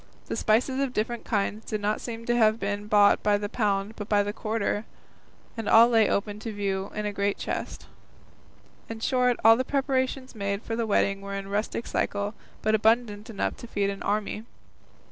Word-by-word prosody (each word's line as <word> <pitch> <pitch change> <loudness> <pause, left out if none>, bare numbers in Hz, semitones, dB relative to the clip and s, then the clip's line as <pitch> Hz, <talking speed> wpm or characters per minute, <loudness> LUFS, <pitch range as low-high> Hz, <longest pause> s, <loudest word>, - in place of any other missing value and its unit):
The - - -4
spices 250 +5 +1
of 275 -2 -1
different 230 +2 -2
kinds 210 0 -1
did 215 - -3
not 210 +1 -1
seem 230 -1 -6
to 240 - +1
have 220 -1 +4
been 205 +1 -3
bought 205 -1 +5
by 205 -1 +3
the 205 0 -3
pound 205 -1 -1
but 210 -1 -7
by 205 -1 +4
the 205 +1 -3
quarter, 215 -1 -1 0.7
and 225 -2 -3
all 230 +2 +8
lay 225 -3 +4
open 205 +1 -1
to 225 +1 -5
view 195 -2 -2
in 210 0 -2
a 205 - -2
great 200 0 0
chest. - - -5 1.0
In 225 0 -6
short, 250 +1 +2
all 225 0 +9
the 255 - 0
preparations 265 -1 -1
made 200 -1 -3
for 225 - -3
the 230 -1 -1
wedding 195 -1 +1
were 200 0 -5
in 195 0 -5
rustic 210 +3 -2
style, 205 +1 -1 0.3
but 215 - +2
abundant 220 -1 +2
enough 215 - -2
to 240 - -9
feed 200 -3 0
an 195 - -8
army. 210 +1 -2
215 Hz, 195 wpm, -27 LUFS, 205-230 Hz, 1.0 s, all